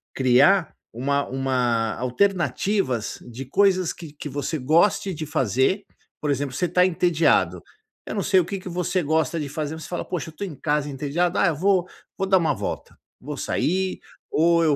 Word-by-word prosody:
criar 135 +8 +4 0.2
uma 140 +4 0
uma 125 -4 0
alternativas 170 - 0
de 130 +3 -7
coisas 185 +3 +2
que 160 -4 -10
que 150 - -7
você 145 +3 -3
goste 170 +8 +2
de 155 -1 -5
fazer, 135 - +1 0.4
por 150 -1 0
exemplo 135 -2 -2
você 180 - 0
está 180 +1 +3
entediado, 175 -2 +2 0.5
eu - - -4
não 200 - -1
sei 190 -1 +4
o 175 - +1
que 195 +1 -4
que 185 - -8
você 180 +1 -1
gosta 160 +1 +1
de 150 - -3
fazer 150 +1 -4
mas 160 - -9
você - - -9
fala: 175 - -3
"Poxa, 175 -3 -4
eu - - -10
estou 195 +6 -5
em 155 - -8
casa 150 +1 -1
entediado, 150 +6 -1
ah 195 - +4
eu 160 - +1
vou 185 +2 +2 0.3
vou 195 - 0
dar 190 -1 +5
uma 165 - +1
volta, - - -5 0.2
vou 145 +1 -6
sair, 185 +2 -1 0.3
ou 170 +1 +3
eu 155 -3 +3
160 Hz, 190 wpm, -24 LUFS, 140-185 Hz, 0.5 s, dar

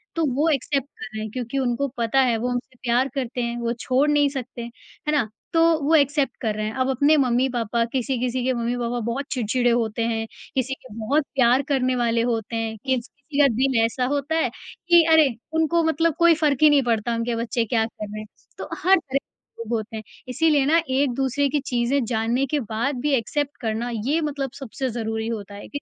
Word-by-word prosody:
तो 330 - +1
वो 305 +4 +2
एक्सेप्ट 275 -1 0
कर - - -5
रहे 215 - -4
हैं 215 - -4
क्योंकि 250 +2 -4
उनको 255 +2 0
पता 235 +3 +1
है 240 -3 +2
वो 240 +3 -2
हमसे 245 +1 -4
प्यार 245 +2 +2
करते 250 -2 -2
हैं, 235 0 -2
वो 235 0 -1
छोड़ 265 +4 +2
नहीं 290 -1 +3
सकते, 255 -3 -6
है 240 +5 -7
ना? 280 -7 +2 0.3
तो 330 - +4 0.2
वो 310 +3 +2
एक्सेप्ट 285 -1 +2
कर 215 -3 -1
रहे 215 0 -2
हैं। 215 - -3
अब 255 - +1
अपने 285 +4 +4
मम्मी-पापा 240 -3 +1
किसी-किसी 255 -1 -1
के 260 - +2
मम्मी-पापा 240 0 -2
बहुत 255 +4 -2
चिड़चिड़े 245 0 +1
होते 230 -1 0
हैं, 225 -1 -1 0.3
किसी 265 0 0
के 255 -5 -12
बहुत 270 +7 +1
प्यार 255 0 +4
करने 255 -2 +1
वाले 235 -1 +1
होते 230 -1 -2
हैं। 225 -1 -2
किसी-किसी 270 +4 -4
का 285 - +7
दिल 260 -1 +2
ऐसा 250 +2 -1
होता 290 +2 -1
है 325 - +2
कि 345 -1 +2
अरे! 315 -3 +6 0.2
उनको 320 +1 +2
मतलब 320 0 +1
कोई 340 0 +6
फ़र्क 300 -4 +1
ही 305 - +9
नहीं 285 -2 +4
पड़ता 235 0 0
उनके 230 +1 -1
बच्चे 230 0 -1
क्या 225 0 +1
कर 215 -1 -7
रहे 215 - -6
हैं, 215 - -8 0.3
तो - - -7
हर 380 +2 +6
तरह 275 -4 -2
के 230 - -11
लोग 230 +1 -5
होते 220 +1 -6
हैं। 215 - -7 0.2
इसीलिए 290 +2 +2
ना 325 +3 +4
एक-दूसरे 270 +1 +1
की 295 - 0
चीज़ें 245 +2 +1
जानने 235 +3 0
के - - +2
बाद 255 +5 0
भी 295 -1 +1
एक्सेप्ट 290 +5 -2
करना 225 +1 -2 0.2
ये 315 +4 +1
मतलब 280 -4 -3
सबसे 265 0 -4
ज़रूरी 225 -1 -3
होता 205 -3 -5
है। 205 - -9
255 Hz, 210 wpm, -23 LUFS, 230-280 Hz, 0.3 s, ही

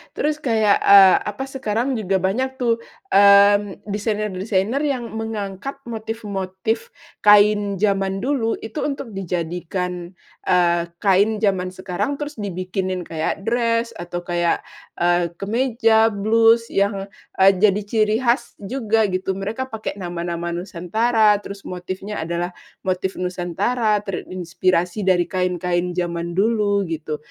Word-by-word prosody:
Terus 300 0 -1
kayak, 220 -7 +2
eee, 195 -2 +8
apa, 210 +5 -4
sekarang 265 -2 -2
juga 190 -2 0
banyak 260 +8 0
tuh, 235 -3 0 0.3
mmm, 200 0 +5
desainer-desainer 210 +1 -1
yang 270 -6 -2
mengangkat 220 +2 -5
motif-motif 220 -2 -4 0.3
kain 205 -1 +5
zaman 195 0 0
dulu, 250 -4 0
itu 220 +6 -5
untuk 275 -4 -5
dijadikan, 180 -1 -4 0.3
eee, 175 -1 +3 0.2
kain 200 +2 +4
zaman 190 -3 +1
sekarang 185 +9 -3
terus 295 -2 -6
dibikinin 185 -1 -3
kayak 165 +3 -3
dress, 230 0 0
atau 175 0 -5
kayak, 175 -1 0 0.3
eee, 175 -1 +1
kemeja, 225 +2 +2
blus 225 +3 +3
yang, 200 0 0 0.3
eee, 195 - +8
jadi 210 0 +3
ciri 215 +1 +1
khas 235 0 0
juga 225 0 0
gitu, 185 +1 -2
mereka 210 +7 -4
pakai 220 -4 -6
nama-nama 170 -1 -4
nusantara, 210 +5 +2
terus 200 0 -9
motifnya 185 +2 -5
adalah 170 +2 -3 0.3
motif 185 0 -1
nusantara 185 +5 0
terinspirasi 185 0 -2
dari 180 -2 +2
kain-kain 180 -1 -1
zaman 170 0 -5
dulu, 205 -1 +2
gitu. 160 -2 -4
200 Hz, 120 wpm, -21 LUFS, 180-225 Hz, 0.3 s, eee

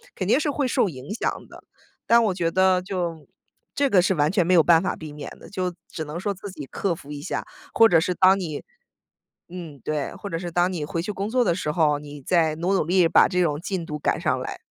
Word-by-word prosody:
肯 - - -3
定 - - +4
是 300 - -1
会 285 -1 -1
受 220 - +2
影 135 +6 -8
响 230 - -3
的， - - -14 0.4
但 235 0 +5
我 200 - +1
觉 170 -2 0
得 185 0 +3
就 175 -5 -4 0.5
这 280 -1 +2
个 190 -5 +5
是 185 +1 +1
完 150 +2 +2
全 190 -4 +2
没 185 - +3
有 165 - +6
办 165 0 +5
法 190 - -2
避 155 -2 -9
免 150 -1 -7
的， - - -13
就 185 -2 -3
只 160 - -6
能 150 +3 -6
说 200 +2 -2
自 195 +2 -9
己 150 -6 -8
克 180 +5 -2
服 145 -2 -12
一 145 -1 -6
下， 185 - -4 0.3
或 225 - +7
者 165 -5 +4
是 180 +2 -1
当 190 +1 +5
你 160 -5 -5 0.9
嗯， 170 -5 -9
对， 150 -2 -2
或 200 - -7
者 165 -3 -3
是 175 -1 -5
当 175 +2 +2
你 160 -4 -3
回 165 +2 -3
去 210 +5 -4
工 200 +1 -4
作 245 +1 +2
的 170 - +2
时 155 -5 -2
候， 150 -2 +2
你 145 -1 -10
再 160 0 +2
努 175 +4 -1
努 190 - +2
力 180 +1 +4
把 - - +5
这 180 -1 0
种 150 -2 0
进 185 -2 -3
度 150 -1 -5
赶 - - 0
上 - - 0
来。 - - -5
175 Hz, 275 characters per minute, -24 LUFS, 155-190 Hz, 0.9 s, 或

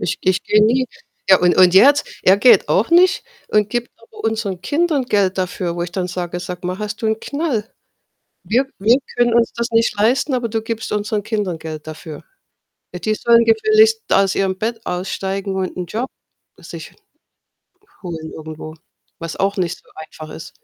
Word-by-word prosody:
Ich 165 - -2
ich 185 +1 +1
gehe 210 0 +4
nie 255 +3 +2 0.4
ja, 190 - +8
und 180 0 +3
und 180 -1 +6
er 195 +8 +8
jetzt 290 0 +2 0.2
er 190 - +5
geht 225 -2 +5
auch 215 - +1
nicht 365 +3 +4 0.2
und 210 -1 +2
gibt 240 +2 -3
aber 230 - -14
unseren 215 -5 -2
Kindern 300 - 0
Geld 200 -5 +1
dafür, 180 -1 -2
wo 175 - -2
ich 175 - -5
dann 180 -1 -2
sage: 180 -1 -4
„Sag 180 0 -7
mal, 185 +2 -3
hast 210 +1 -5
du 220 - +1
'n 220 0 0
Knall? 280 -8 -3 0.7
Wir 250 +5 +1
wir 225 +6 +4 0.2
können 240 -1 +3
uns 235 0 +3
das 235 +1 -3
nicht 230 -1 +2
leisten, 250 +6 +2
aber 245 -2 -1
du 225 0 -2
gibst 225 -1 -5
unseren 210 0 -1
Kindern 205 -5 -2
Geld 155 -1 -8
dafür. 155 -1 -9 0.7
Ja, 180 - -6
die 215 +4 0
sollen 235 +1 +4
gefälligst 435 - +4
aus 195 -1 +3
ihrem 190 -1 0
Bett 225 +2 -3
aussteigen 190 +2 -3
und 190 -1 -3
'n 180 - -3
Job 235 +8 -4 0.5
sich - - -10 1.1
holen 165 -3 -6
irgendwo“, 155 0 -9 0.4
was 165 -1 -6
auch 200 +1 0
nicht 180 -1 -1
so - - -27
einfach 155 0 -10
ist. 160 - -9
205 Hz, 185 wpm, -19 LUFS, 180-235 Hz, 1.1 s, ja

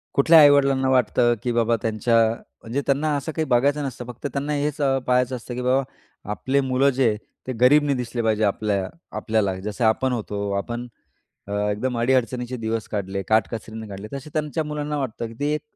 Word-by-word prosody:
कुठल्या 160 +4 +7
आई-वडिलांना 140 -2 +5
वाटतं 125 -1 +3
की 125 - 0
बाबा, 115 0 +2
त्यांच्या 115 +1 0 0.5
म्हणजे 120 +5 -3
त्यांना 140 +3 +1
असं 145 +3 -4
काही 160 0 -2
बघायचं 140 +3 +2
नसतं, 125 -2 -6
फक्त 125 +3 -6
त्यांना 145 +2 -2
हेच 145 0 -1 0.3
पहायचं 125 0 +2
असतं, 120 0 -7
की 125 - -4
बाबा, 130 +2 +2 0.5
आपले 130 +6 0
मुलं 135 +1 +2
जे 125 -5 +2 0.3
ते 130 - -2
गरीब 145 +4 +6
नाही 145 -1 +1
दिसले 120 -1 -3
पाहिजे 110 -1 +1
आपल्या 100 -2 0 0.3
आपल्याला 110 -4 0
जसे 105 +3 -3
आपण 115 +4 +2
होतो, 100 -3 -3
आपण 120 +4 -4 0.6
अ, - - -7 0.2
एकदम 120 +4 -2
अडीअडचणीचे 125 0 0
दिवस 110 -1 -3
काढले, 100 -2 -3
काटकसरीने 110 0 -1
काढले, 100 +1 -8
तसे 140 +2 -6
त्यांच्या 155 +1 -1
मुलांना 150 0 -3
वाटतं, 120 -3 -4
की 115 - -11
ते 145 +1 0
एक 150 - -4
125 Hz, 180 wpm, -23 LUFS, 110-140 Hz, 0.6 s, कुठल्या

